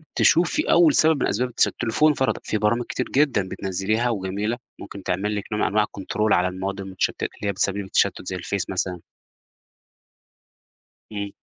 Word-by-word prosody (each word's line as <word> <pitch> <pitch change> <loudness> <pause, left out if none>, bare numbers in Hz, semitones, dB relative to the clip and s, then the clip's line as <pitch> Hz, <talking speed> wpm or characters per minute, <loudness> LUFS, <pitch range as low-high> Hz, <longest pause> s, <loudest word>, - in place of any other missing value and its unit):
تشوفي 180 - +3
أول 320 -4 +6
سبب 155 -3 +3
من - - +2
أسباب 125 +5 0
التشتُّت، - - +3
التليفون 135 +7 +2
فَرَضًا 130 -2 0
فيه - - -1
برامج 115 +3 +1
كتير 130 - -3
جدًا 135 -9 +2
بتنزّليها 105 +5 -1
وجميلة، 105 +2 -2 0.2
ممكن 100 -1 -9
تعمل 100 +4 -1
لِك 105 - -3
نوع 105 - -1
من - - +3
أنواع 105 0 +2
الControl 105 +2 -1
على 90 +1 +2
المواد 95 +2 -4
المشتتة، 95 -1 -2
اللي 105 - -5
هي - - +2
بتسبّب 100 +1 -1
لِك 100 - -3
التشتت 95 - +1
زي 95 - -3
الفيس 90 +1 -3
مثلًا. 90 -1 -2 2.1
إمم. 100 -1 -4
105 Hz, 175 wpm, -23 LUFS, 95-120 Hz, 2.1 s, أول